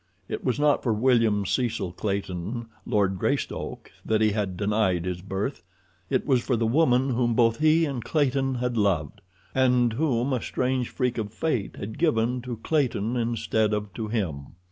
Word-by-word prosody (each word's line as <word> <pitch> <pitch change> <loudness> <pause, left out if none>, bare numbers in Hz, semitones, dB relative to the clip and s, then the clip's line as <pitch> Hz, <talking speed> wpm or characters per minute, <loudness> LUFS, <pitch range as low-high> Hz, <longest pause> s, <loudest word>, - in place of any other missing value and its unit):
It - - -4
was 130 +1 0
not 150 -1 +3
for 115 - +1
William 110 -3 +3
Cecil 115 -4 -1
Clayton, 100 +3 -3 0.2
Lord 95 -3 +1
Greystoke, - - -2
that 110 -1 +1
he 110 -1 +3
had 100 -3 -2
denied 100 -4 +1
his 90 -1 -3
birth. 95 +7 -3 0.5
It - - +1
was 130 -4 +3
for 125 - 0
the 115 0 0
woman 130 +1 +3
whom 120 -1 +1
both 115 0 +3
he 155 +2 +4
and 135 -6 -3
Clayton 135 -3 +1
had 125 -1 -2
loved, 90 -9 0 0.3
and 125 -3 +3
whom 130 -1 0
a 125 - 0
strange 125 -1 -1
freak 125 -3 -1
of 105 -2 -3
fate 125 -4 -2
had 110 +2 -7
given 125 -6 +1
to 120 -1 -5
Clayton 125 -7 0
instead 115 -2 0
of 105 -2 -5
to 110 0 -4
him. 90 -11 -3
115 Hz, 170 wpm, -26 LUFS, 105-130 Hz, 0.5 s, he